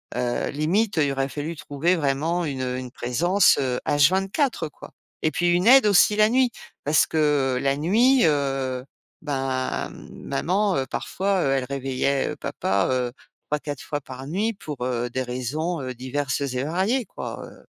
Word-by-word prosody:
heu, 120 Hz, -1 st, -1 dB
limite, 180 Hz, +9 st, 0 dB
il 145 Hz, -3 st, +2 dB
aurait 135 Hz, 0 st, -1 dB
fallu 150 Hz, +3 st, -5 dB
trouver 160 Hz, +6 st, 0 dB
vraiment 160 Hz, +4 st, 0 dB
une, 135 Hz, -3 st, -3 dB
heu, 125 Hz, 0 st, -2 dB
une 125 Hz, -1 st, -6 dB
présence, 175 Hz, +13 st, +3 dB
heu, 125 Hz, -2 st, -1 dB
H 145 Hz, +1 st, +4 dB
24, 195 Hz, -, 0 dB
heu, -, -, -12 dB
quoi -, -, -13 dB, 0.3 s
et 155 Hz, -, +2 dB
puis 175 Hz, +3 st, +1 dB
une 175 Hz, +3 st, +2 dB
aide 260 Hz, -2 st, +7 dB
aussi 205 Hz, +1 st, +5 dB
la 215 Hz, 0 st, +4 dB
nuit 255 Hz, 0 st, +3 dB, 0.3 s
parce 150 Hz, +2 st, +3 dB
que 145 Hz, -4 st, +1 dB
la 135 Hz, 0 st, +1 dB
nuit, 230 Hz, -, +3 dB
heu, 135 Hz, -3 st, 0 dB, 0.4 s
ben, 135 Hz, -3 st, -2 dB, 0.2 s
maman, 185 Hz, +6 st, 0 dB
heu, 135 Hz, -, 0 dB
parfois, 195 Hz, +4 st, -1 dB
elle 135 Hz, -1 st, +1 dB
réveillait, 135 Hz, 0 st, -1 dB
heu, -, -, -4 dB
papa, 100 Hz, +1 st, -1 dB
heu, 125 Hz, -1 st, 0 dB, 0.4 s
3-4 145 Hz, -2 st, -3 dB
fois 145 Hz, -, -3 dB
par 130 Hz, 0 st, -9 dB
nuit 210 Hz, +8 st, -1 dB
pour, 150 Hz, -10 st, -7 dB
heu, 120 Hz, -1 st, -1 dB
des 130 Hz, +2 st, -2 dB
raisons, 140 Hz, +7 st, -3 dB
heu, 130 Hz, -1 st, -5 dB
diverses 130 Hz, +2 st, -2 dB
et 130 Hz, -2 st, -2 dB
variées, 195 Hz, -, 0 dB
quoi, -, -, -7 dB
heu -, -, -14 dB
145 Hz, 170 wpm, -24 LUFS, 130-180 Hz, 0.4 s, aide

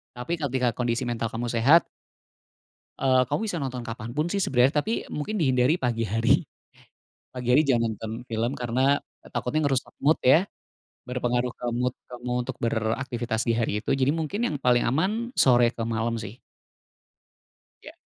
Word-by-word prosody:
Tapi, 125 Hz, +7 st, -4 dB
ketika 130 Hz, -4 st, 0 dB
kondisi 120 Hz, 0 st, -1 dB
mental 115 Hz, -1 st, -2 dB
kamu 115 Hz, +2 st, -4 dB
sehat 135 Hz, +9 st, +5 dB, 1.1 s
eee, 130 Hz, -1 st, +3 dB
kamu -, -, 0 dB
bisa 190 Hz, -5 st, -2 dB
nonton 125 Hz, -3 st, -4 dB
kapanpun 120 Hz, +6 st, -3 dB
sih 200 Hz, -, 0 dB
sebenarnya. 130 Hz, -2 st, +3 dB
Tapi, 225 Hz, +7 st, -2 dB
mungkin 180 Hz, +9 st, -3 dB
dihindari 130 Hz, -1 st, +3 dB
pagi 120 Hz, -4 st, -1 dB
hari. 115 Hz, +3 st, +3 dB, 0.9 s
Pagi 125 Hz, -1 st, -6 dB
hari 150 Hz, -, +6 dB
jangan 115 Hz, -6 st, +1 dB
nonton 110 Hz, +1 st, -6 dB
film, 115 Hz, +2 st, -1 dB
karena 130 Hz, +4 st, +2 dB, 0.3 s
takutnya 155 Hz, +5 st, -1 dB
ngerusak 135 Hz, -2 st, -1 dB
mood 155 Hz, +3 st, +4 dB
ya. 155 Hz, +8 st, +5 dB, 0.6 s
Berpengaruh 125 Hz, 0 st, -1 dB
ke -, -, -7 dB
mood 125 Hz, +1 st, 0 dB, 0.2 s
kamu 125 Hz, 0 st, -7 dB, 0.2 s
untuk -, -, -5 dB
beraktivitas 115 Hz, 0 st, -1 dB
di 115 Hz, -, +3 dB
hari 105 Hz, -2 st, 0 dB
itu, -, -, -6 dB
jadi 130 Hz, +1 st, +2 dB
mungkin 165 Hz, +7 st, -3 dB
yang 150 Hz, -, -1 dB
paling 125 Hz, -1 st, +3 dB
aman, 205 Hz, -, 0 dB
sore 120 Hz, -2 st, +5 dB
ke 115 Hz, -, -6 dB
malam 115 Hz, 0 st, -1 dB
sih. 110 Hz, +3 st, -9 dB, 1.4 s
Iya. -, -, -10 dB
125 Hz, 155 wpm, -26 LUFS, 115-140 Hz, 1.4 s, hari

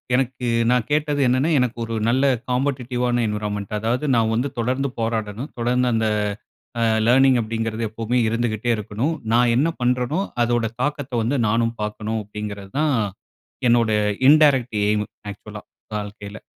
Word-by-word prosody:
"எனக்கு 125 Hz, -1 st, -1 dB, 0.2 s
நான் 125 Hz, -3 st, +1 dB
கேட்டது 150 Hz, -1 st, +1 dB
என்னன்னா, 130 Hz, +6 st, +2 dB
எனக்கு 125 Hz, -1 st, 0 dB
ஒரு 115 Hz, -, -5 dB
நல்ல 130 Hz, +3 st, +2 dB, 0.3 s
காம்பட்டிட்டிவ்வான 125 Hz, -2 st, 0 dB
என்வைரன்மென்ட் 105 Hz, -1 st, -3 dB
அதாவது 120 Hz, +6 st, -1 dB
நான் 110 Hz, -1 st, +2 dB
வந்து 125 Hz, +5 st, 0 dB
தொடர்ந்து 130 Hz, +4 st, 0 dB
போராடணும், 115 Hz, +3 st, -2 dB
தொடர்ந்து 125 Hz, +1 st, +1 dB
அந்த 110 Hz, -1 st, +1 dB, 0.7 s
அ -, -, +1 dB, 0.2 s
லர்னிங் 130 Hz, +1 st, +5 dB
அப்படிங்கிறது 115 Hz, 0 st, -3 dB
எப்பவுமே 115 Hz, +3 st, -2 dB
இருந்துகிட்டே 115 Hz, 0 st, -1 dB
இருக்கணும். 110 Hz, +9 st, -2 dB, 0.2 s
நான் 120 Hz, 0 st, +4 dB
என்ன 145 Hz, +6 st, +3 dB
பண்றேனோ 125 Hz, +7 st, +1 dB, 0.2 s
அதோட 120 Hz, -1 st, +1 dB
தாக்கத்த 145 Hz, -1 st, -2 dB
வந்து 130 Hz, +5 st, 0 dB
நானும் 115 Hz, +1 st, +1 dB
பார்க்கணும், 105 Hz, +1 st, -3 dB
அப்படிங்கிறது 105 Hz, -1 st, -7 dB
தான் 150 Hz, -2 st, +2 dB, 0.7 s
என்னுடைய 115 Hz, -3 st, +3 dB, 0.3 s
இன்டேரக்ட் 140 Hz, -6 st, +5 dB
ஏய்ம், 105 Hz, 0 st, +1 dB, 0.3 s
ஆக்சுவல்லா 105 Hz, +1 st, -10 dB, 0.4 s
வாழ்க்கையில." 105 Hz, 0 st, -8 dB
120 Hz, 135 wpm, -22 LUFS, 110-130 Hz, 0.7 s, லர்னிங்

